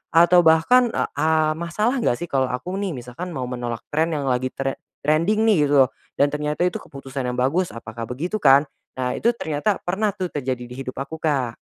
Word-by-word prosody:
Atau 175 +1 +7
bahkan, 235 +11 +5
eee - - 0
eee, 155 -1 +2
masalah 215 +10 0
nggak 120 - +1
sih - - -4
kalau 130 -2 +2
aku 125 +9 -4
nih 190 -7 -2
misalkan 125 +9 -7
mau 130 - -3
menolak 120 -2 -4
trend 160 +1 +1
yang 145 - -2
lagi 125 +1 0
tre 135 +1 -4 0.2
trending 170 +9 +2
nih 180 -10 +4
gitu 145 - 0
lo, - - -6 0.3
dan 145 0 +2
ternyata 150 +3 -1
itu 180 - 0
keputusan 135 -1 -6
yang 125 - -2
bagus, 150 +9 +1
apakah 115 0 -7
begitu 175 +12 -3
kan? 140 -2 +6 0.3
Nah, 125 -1 -1
itu 235 - +3
ternyata 160 +3 -1
pernah 200 +4 -1
tuh 185 -3 -2
terjadi 130 -3 -3
di - - -7
hidup 130 -1 -5
aku 150 +4 -5
Kak. 135 -7 0
150 Hz, 205 wpm, -22 LUFS, 130-175 Hz, 0.3 s, Atau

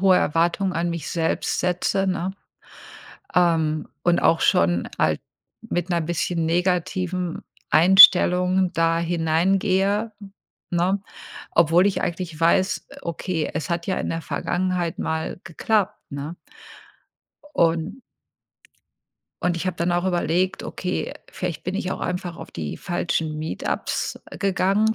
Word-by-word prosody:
hohe 190 -1 +5
Erwartungen 170 +5 +1
an 170 0 -1
mich 170 -3 -4
selbst 165 -1 -1
setze, 180 +2 0
ne? 185 0 -1 1.0
Ähm, 160 -3 +2 0.2
und 175 0 +3
auch 165 - +4
schon 85 +1 +2
halt - - +1 0.4
mit 180 -6 -3
‘ner 175 -1 +1
bisschen 170 +1 -1
negativen 180 +1 -1 0.3
Einstellung 180 +1 +6
da 165 0 +2
hineingehe, 185 +5 +1 0.6
ne? 180 +3 +1 0.5
Obwohl 170 +4 +4
ich 200 - -1
eigentlich 170 -2 -4
weiß, 185 +3 +2
äh: - - -14
„Okay, 170 -1 -3
es 155 +4 -3
hat 170 +1 -2
ja 190 - 0
in - - -3
der 165 - -3
Vergangenheit 175 +2 -2
mal 160 +2 -3
geklappt“, 205 +4 0
ne? 140 +4 -5 1.2
Un 165 +8 +1 1.4
und 175 -1 +1
ich 175 - -3
habe 185 -2 -2
dann 175 +1 0
auch 175 +1 0
überlegt: 180 +1 0
„Okay, 180 - -3 0.2
vielleicht 170 -3 -4
bin 185 +2 -3
ich 190 -2 -2
auch - - -6
einfach 180 -1 -3
auf - - -10
die 75 -3 -5
falschen 165 -3 -2
Meet-Ups 155 +1 -3 0.2
gegangen. 200 +3 +2
175 Hz, 130 wpm, -23 LUFS, 165-185 Hz, 1.4 s, Einstellung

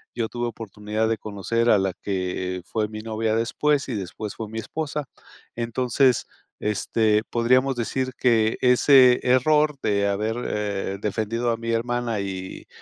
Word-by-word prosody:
yo 115 -2 -2
tuve 120 0 -3
oportunidad 110 -1 -3
de 115 - 0
conocer 110 +4 -1
a 105 - +6
la 95 0 0
que 90 -1 -3
fue 110 -1 -1
mi 110 0 -7
novia 110 0 -1
después, 140 +5 +1
y 120 - -2
después 100 +2 -5
fue 110 - -5
mi 110 - -7
esposa. 150 +4 -4 0.5
Entonces, 125 +2 +1 0.3
este, 105 +1 +1
podríamos 130 +3 +2
decir 130 +2 -2
que 115 -3 +2
ese 125 0 +6
error 150 +4 +3
de 100 -1 +1
haber, 105 +3 -1
eh, 100 -2 -2
defendido 110 +3 -1
a 115 - -1
mi 115 0 -5
hermana 120 -1 -1
y 95 -1 -6
115 Hz, 150 wpm, -24 LUFS, 105-125 Hz, 0.5 s, a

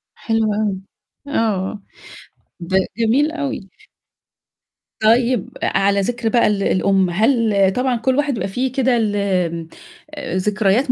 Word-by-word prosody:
حلو 225 -2 0
أوي. 205 -3 -1 0.5
آه. 210 -6 -1 0.8
ب 170 +1 -8 0.3
جميل 245 +7 +2
أوي. 280 -10 -4 1.3
طيب 235 0 +3
أ - - +2
أ - - 0
على 200 0 +2
ذكر 235 +2 -1
بقى 235 +1 +3
ال 205 -1 0
الأم، 190 -1 +2
هل 210 -1 +2
طبعًا 250 0 +1
كل 255 +3 0
واحد 290 -2 +1
يبقى 185 - -2
في 250 +7 -1
كده 255 -1 +1
ال 215 -3 0 1.0
آآ 185 - -4
ذكريات 210 +6 +1
220 Hz, 130 wpm, -19 LUFS, 195-250 Hz, 1.3 s, طيب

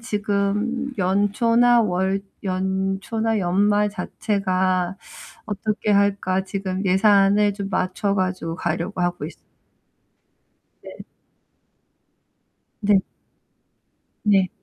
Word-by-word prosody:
지금 210 +4 -1
연초나 230 +5 +3
월 190 0 0 0.2
연초나 195 +4 -1
연말 205 +3 +2
자체가 185 -2 -1 0.5
'어떻게 210 0 -2
할까?' 200 -2 +1
지금 195 0 -4
예산을 200 +1 +4
좀 200 -1 -5
맞춰 190 +2 -1
가지고 185 -4 -2
가려고 170 +2 -3
하고 175 0 -1
있어요. - - -12 1.4
네. - - -10 1.9
네. 205 -2 +3 1.2
네. 195 -3 +3
200 Hz, 170 characters per minute, -22 LUFS, 185-210 Hz, 1.9 s, 예산을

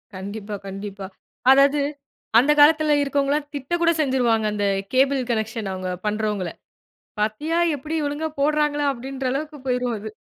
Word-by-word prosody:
கண்டிப்பா, 200 +2 -6
கண்டிப்பா. 195 0 -7 0.4
அதாவது 280 +1 +5 0.6
அந்த 285 +4 +3
காலத்தில 305 0 +6
இருக்கவங்களாம் 285 +1 0
திட்ட 280 +4 -5
கூட 335 0 +4
செஞ்சுருவாங்க. 245 -5 +1
அந்த 205 -1 -1 0.3
கேபிள் 270 +1 +3
கனெக்ஷன் 220 -2 -2
அவங்க 185 0 -4 0.2
பண்றவங்கள. 210 -3 -1 0.7
"பாத்தியா 300 +11 0 0.2
எப்படி 305 +4 -5
ஒழுங்கா 310 +2 -3
போடுறாங்களா?" 295 0 +1
அப்படின்ற 265 +2 -6
அளவுக்கு 300 +2 -4
போய்ருவாங்க. 245 -4 -1
265 Hz, 125 wpm, -23 LUFS, 215-290 Hz, 0.7 s, காலத்தில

